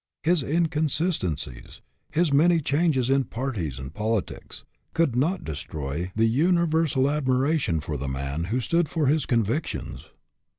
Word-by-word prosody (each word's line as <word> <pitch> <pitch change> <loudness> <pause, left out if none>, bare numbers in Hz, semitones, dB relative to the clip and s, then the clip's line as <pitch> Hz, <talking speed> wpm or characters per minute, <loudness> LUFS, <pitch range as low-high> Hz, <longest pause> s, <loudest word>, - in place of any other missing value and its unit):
His 170 0 +3
inconsistencies, 150 - -1 0.3
his 165 -2 +2
many 165 +4 +5
changes 145 -3 +1
in 135 0 +2
parties 110 - -3
and 65 0 -7
politics, 110 -1 -3 0.3
could 165 -8 +2
not 160 +10 +1
destroy 75 +3 -5
the 110 +1 +3
uni 170 +9 +3
versal 155 -5 +2
admiration 130 - +1
for 75 0 -4
the 70 +1 -4
man 70 +4 -3
who 115 +8 -1
stood 170 +4 +1
for 160 -2 0
his 145 +1 +2
convictions. 120 +6 -2
130 Hz, 135 wpm, -25 LUFS, -, 0.3 s, many